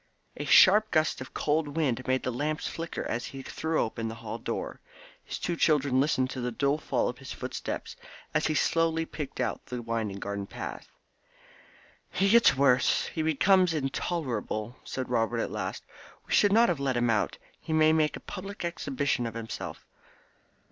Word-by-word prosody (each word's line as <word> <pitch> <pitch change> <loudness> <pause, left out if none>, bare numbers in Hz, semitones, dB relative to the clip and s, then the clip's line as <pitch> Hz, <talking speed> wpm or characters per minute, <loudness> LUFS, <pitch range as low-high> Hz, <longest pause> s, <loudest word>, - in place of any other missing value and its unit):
A - - -5
sharp 210 +3 +7
gust 155 -6 +1
of 130 - -9
cold 150 0 0
wind 130 -6 0
made 130 0 +1
the 125 - -1
lamps 150 +5 -2
flicker 165 0 -4
as 120 +1 -2
he 135 -1 -8
threw 160 +3 -2
open 115 0 -1
the 110 - -5
hall 115 - -6
door. - - -4 0.4
His - - -5
two 175 - -2
children 145 -5 +3
listened 140 -3 +1
to 130 - -4
the 125 0 -2
dull 140 +5 +1
fall - - 0
of - - -5
his - - -9
footsteps - - -5 0.4
as 150 - +2
he 155 - 0
slowly 165 +1 +2
picked 150 -3 -7
out - - -1
the 125 - -4
winding 115 -3 -2
garden 100 0 -4
path. - - -7 1.2
"He 195 - +1
gets 230 - +6
worse 130 -2 +3
he 160 - -1
becomes 170 +3 +3
intolerable," 130 - -2
said 130 -1 -4
Robert 120 -1 0
at - - -2
last. - - -4 0.4
"We - - -4
should 205 - +5
not 230 +3 +6
have 170 -5 0
let 135 -3 0
him 120 -1 +2
out; 105 -2 0 0.2
he - - -7
may 155 0 +5
make 155 -1 +2
a - - -7
public 195 0 -6
exhibition 140 -6 -1
of 115 - -7
himself." 115 -1 -6
140 Hz, 180 wpm, -28 LUFS, 120-160 Hz, 1.2 s, sharp